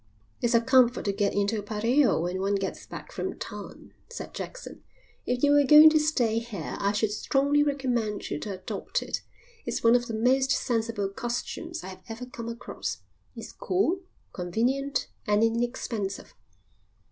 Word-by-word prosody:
"It's 240 0 +2
a 230 - +5
comfort 255 0 +4
to 200 - +1
get 200 0 0
into 205 +2 +1
a - - -3
pareo 225 - +2
when 180 +2 -2
one 200 +1 +1
gets 195 -1 -4
back - - -9
from - - -4
town," - - -9 0.2
said 475 - -8
Jackson. - - -8 0.5
"If 245 +1 -1
you 285 - +5
were 290 0 +6
going 300 +3 +9
to 310 - +4
stay 245 -8 +1
here 225 -8 -6
I 200 - +1
should 205 0 0
strongly 280 +6 +2
recommend 250 -7 -1
you 145 - -2
to 205 - -5
adopt 185 0 -3
it. - - -3 0.4
It's - - -3
one 230 0 +6
of 240 0 +1
the 225 - -3
most 260 +4 +3
sensible 225 -5 0
costumes 240 +10 -4
I - - -7
have 185 - -10
ever 230 +3 -6
come 235 -2 -7
across. 235 +1 -5 0.4
It's - - -8
cool, 380 -5 0 0.3
convenient, 245 +10 -1 0.2
and 210 +1 +3
inexpensive." 225 -3 -2
235 Hz, 170 wpm, -27 LUFS, 210-270 Hz, 0.5 s, going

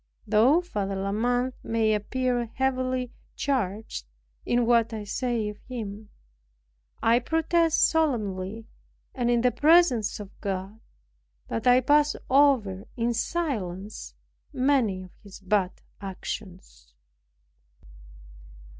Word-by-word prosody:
Though 235 +10 +4
Father 205 - -3
La 195 +1 -2
Mothe 245 +4 0
may 225 -1 +1
appear 245 +3 -1
heavily 255 -1 -1 0.2
charged 215 - -2 0.4
in 240 0 +2
what 230 -1 +3
I 215 -1 -4
say 230 +1 -2
of 210 0 -7
him, 215 -4 -6 0.9
I 230 +2 +5
protest 325 +4 +2
solemnly, 220 - -1 0.5
and 245 -3 -1
in 240 -1 +3
the 250 +1 +3
presence 290 -5 +4
of 205 -1 -8
God, 195 +1 -4 0.7
that 225 - -2
I 250 +1 +6
pass 295 +3 +3 0.2
over 255 -9 +3
in 235 0 +1
silence 210 - -3 0.4
many 250 -8 +1
of 185 - -13
his 200 -2 -12
bad 195 -1 -1 0.2
actions. 180 - -8
230 Hz, 110 wpm, -26 LUFS, 200-255 Hz, 0.9 s, I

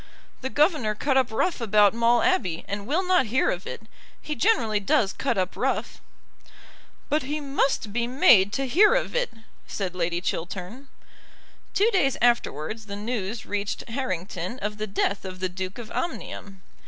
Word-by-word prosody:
"The 260 - -3
governor 290 - +2
cut 270 +5 0
up 260 -2 +3
rough 245 +6 -1
about 210 -2 +4
Maule 235 +4 +3
Abbey, 210 - +1
and 200 +1 -4
will 325 +8 +1
not 360 -9 +3
hear 250 +5 +2
of 180 +2 -5
it. - - -7 0.4
He 300 - -5
generally 260 - +2
does 195 0 +1
cut - - -1
up 185 -1 -1
rough." - - -2 1.1
"But 300 +2 +1
he 290 +3 -3
must 275 -6 -1
be 235 +1 0
made 245 - +5
to 270 +5 0
hear 410 - +5
of - - -1
it," - - 0 0.4
said 190 -3 -3
Lady 175 -1 -1
Chiltern. 185 +9 -5 0.9
Two 430 +4 +4
days 275 -9 +2
afterwards 220 -3 0
the 200 - -5
news 215 0 -4
reached 205 0 -3
Harrington 190 -4 -3
of 210 -2 -4
the 215 - -2
death 200 0 -1
of 185 -1 -7
the 185 0 -1
Duke 185 +1 -5
of 235 -2 -8
Omnium. 200 - -5
220 Hz, 165 wpm, -25 LUFS, 195-275 Hz, 1.1 s, made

